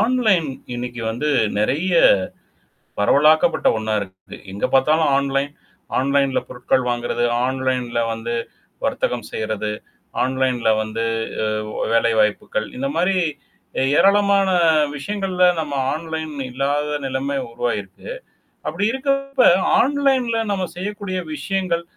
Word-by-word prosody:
Online 220 - +2 0.3
இன்னைக்கு 120 0 -5
வந்து 130 +7 -2 0.3
நெறைய 150 - 0 1.1
பரவலாக்கப்பட்ட 150 +9 +4
ஒண்ணா 110 0 -2
இருக்குது. 95 -1 -10 0.2
எங்க 100 - -4
பார்த்தாலும் 150 +3 +4
ஆன்லைன். 140 0 0 0.5
ஆன்லைன்ல 140 0 +2
பொருட்கள் 125 +1 0
வாங்குறது, 120 0 -1 0.2
ஆன்லைன்ல 130 -2 -1
வந்து 115 +1 -4 0.5
வர்த்தகம் 120 -3 -1
செய்றது, 110 -1 -2 0.5
ஆன்லைன்ல 130 -2 0
வந்து 110 +1 -3 0.8
அ - - -2
வேலைவாய்ப்புகள். 110 -2 +1
இந்த 135 +2 -2
மாரி, 180 +3 +2 0.8
ஏராளமான 200 0 +4 0.5
விஷயங்கள்ல 185 +3 -1 0.2
நம்ம 145 -2 -4 0.2
ஆன்லைன் 160 -1 -5 0.2
இல்லாத 145 +3 -1
நிலைமை 135 +2 -2
உருவாகிருக்கு. 110 - -4 0.6
அப்படி - - -2
இருக்கப்ப 275 0 +1 0.3
ஆன்லைன்ல 265 -4 +2
நம்ம 190 -2 -1
செய்யக்கூடிய 200 0 -4 0.2
விஷயங்கள், 170 +2 -1
140 Hz, 100 wpm, -21 LUFS, 120-190 Hz, 1.1 s, பரவலாக்கப்பட்ட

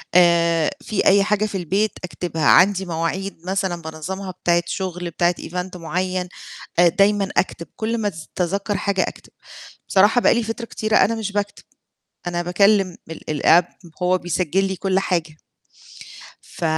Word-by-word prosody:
آآ، 170 -2 +4
في 210 - -1
أي 195 0 +5
حاجة 210 +1 +1
في 200 -2 -3
البيت 195 +5 0
أكتبها، 160 -1 -3
عَندي 190 0 +5
مواعيد 170 +4 -3
مثلًا 190 -2 -2
بانظمها 185 +5 -6
بتاعة 175 -1 +1
شغل 180 -1 -4
بتاعة 175 +2 +1
Event 180 +1 -5
معيّن، 180 +2 -2 0.5
آآ 175 - +7
دايمًا 200 +2 +2
أكتب 170 -2 -1
كُل 225 +1 -2
ما 215 -2 -1 0.3
أتذكَّر 200 +3 -1
حاجة 200 -2 0
أكتب، - - -10 0.6
بصراحة 205 +5 +4
بقى - - +4
لي 235 - +1
فترة 225 +2 -4
كتيرة 215 -1 -1
أنا 230 - +4
مش 210 -2 -4
باكتب 205 0 -3 0.6
أنا 175 0 -1
باكلم 195 +1 +2
ال 155 -2 -5
الApp، 170 +1 +6 0.4
هو 185 +1 +3
بيسجل 180 +1 0
لي 190 -1 -2
كُل 190 0 0
حاجة. 170 -6 -1 1.1
ف - - -8
185 Hz, 150 wpm, -21 LUFS, 175-200 Hz, 1.1 s, آآ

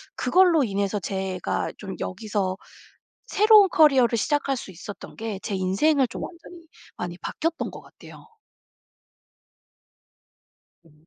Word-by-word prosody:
그걸로 355 -5 +4
인해서 200 -2 -1
제가 190 0 -3
좀 195 -2 -7
여기서 200 -1 -2 0.7
새로운 425 -1 +6
커리어를 265 -8 +4
시작할 280 +2 0
수 230 - -8
있었던 195 +4 -10
게 220 -3 -5
제 210 - -4
인생을 240 +10 +2
좀 230 - -7
완전히 335 0 -12 0.3
많이 175 -1 -5
바뀌었던 330 - -3
것 - - -10
같아요. - - -15 2.6
네. 165 - -22
225 Hz, 250 characters per minute, -24 LUFS, 190-315 Hz, 2.6 s, 새로운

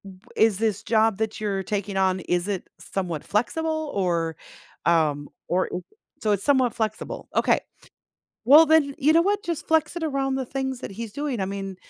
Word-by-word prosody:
w 205 +6 -23
is 220 -3 +3
this 220 -1 0
job 220 -2 +2
that 220 0 -2
you're 200 -2 -2
taking 200 0 -3
on, 190 -1 +2
is 175 +2 -1
it 195 -3 -4
somewhat 175 -6 -4
flexible? 315 +7 -1
Or 170 -4 0 0.5
um, 150 -4 +2 0.2
or 185 +1 +1 0.5
so 215 - +1
it's 200 -1 0
somewhat 260 -4 +3
flexible. 220 -1 -4
Okay. - - +3 0.9
Well, 295 +6 +9
then, 300 -3 +3
you 300 +3 +4
know 330 +1 +5
what? 405 +3 0
Just 335 -3 -4
flex 320 +1 +2
it 340 - -2
around 275 -3 -1
the 265 -1 -3
things 265 0 -3
that - - -7
he's 225 +1 -7
doing. 285 -5 -3
I 190 - 0
mean, 195 -1 -5
220 Hz, 180 wpm, -24 LUFS, 190-280 Hz, 0.9 s, Well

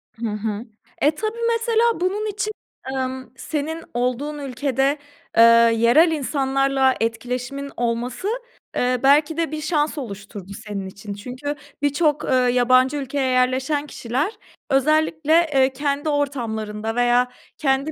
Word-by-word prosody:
Hı 230 0 -3
hı. 210 +2 -3 0.4
E, 295 - +5
tabii 435 +6 -3 0.2
mesela 460 0 +1 0.2
bunun 395 +4 0
için, 410 +1 -2 0.4
ımm, 260 -1 -3
senin 315 +2 -3
olduğun 255 +5 -1
ülkede, 270 +1 0 0.4
eee, 230 - +9 0.3
yerel 240 +9 +5
insanlarla 270 -2 +1
etkileşimin 250 +5 -3
olması, 240 - -2 0.5
ııı, 250 0 +1
belki 295 +3 +4
de 330 -3 0
bir 310 0 -4
şans 305 -1 0
oluşturdu 200 -5 -7
senin 200 -2 -4
için. 200 +2 -8
Çünkü 255 +8 -5 0.3
birçok, 295 +1 +1
ııı, 255 -1 +3
yabancı 255 +3 +4
ülkeye 270 -1 -1
yerleşen 260 +4 +1
kişiler 265 - -2 0.4
özellikle, 310 +3 +2 0.2
eee, 265 -1 +3
kendi 285 +2 -1
ortamlarında 225 -7 -2
veya 245 +1 +3 0.3
kendi 275 +1 +1
270 Hz, 125 wpm, -22 LUFS, 245-295 Hz, 0.5 s, eee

